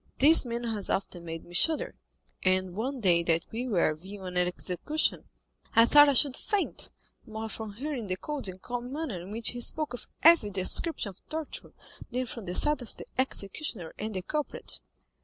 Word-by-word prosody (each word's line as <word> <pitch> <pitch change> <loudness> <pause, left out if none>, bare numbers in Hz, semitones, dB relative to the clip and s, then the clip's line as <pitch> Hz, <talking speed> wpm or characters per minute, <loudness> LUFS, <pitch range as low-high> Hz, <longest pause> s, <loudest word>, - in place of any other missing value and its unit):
This 300 +2 +6
man 235 0 -3
has 220 -4 -2
often 180 -3 -2
made 165 0 -6
me 175 - -14
shudder; 315 - +2 0.5
and 185 -1 +1
one 250 +6 -3
day 175 -4 +4
when 165 -1 +2
we 240 +3 -3
were 175 -8 +2
viewing 185 +3 -9
an 180 0 +3
execution, 180 - 0 0.5
I 230 - +8
thought 290 +3 +8
I - - +3
should 275 -1 +6
faint, 410 -2 -1 0.4
more 220 0 -5
from 220 -1 -6
hearing 255 -1 -4
the 185 0 -2
cold 290 +1 -3
and 185 0 -7
calm 245 +3 -5
manner 280 - -4
in 180 - -10
which 225 +2 -1
he 245 - -5
spoke 305 +3 -1
of 245 - -7 0.2
every 330 -10 +7
description 200 - +2
of 190 - -14
torture, 315 -1 -5 0.4
than 255 +1 -2
from 230 -3 -7
the 180 0 -2
sight 295 +4 +3
of 240 - -8
the - - -8
executioner 210 - -1
and 215 0 -4
the 185 - -3
culprit." 300 +5 -2
225 Hz, 190 wpm, -29 LUFS, 185-275 Hz, 0.5 s, I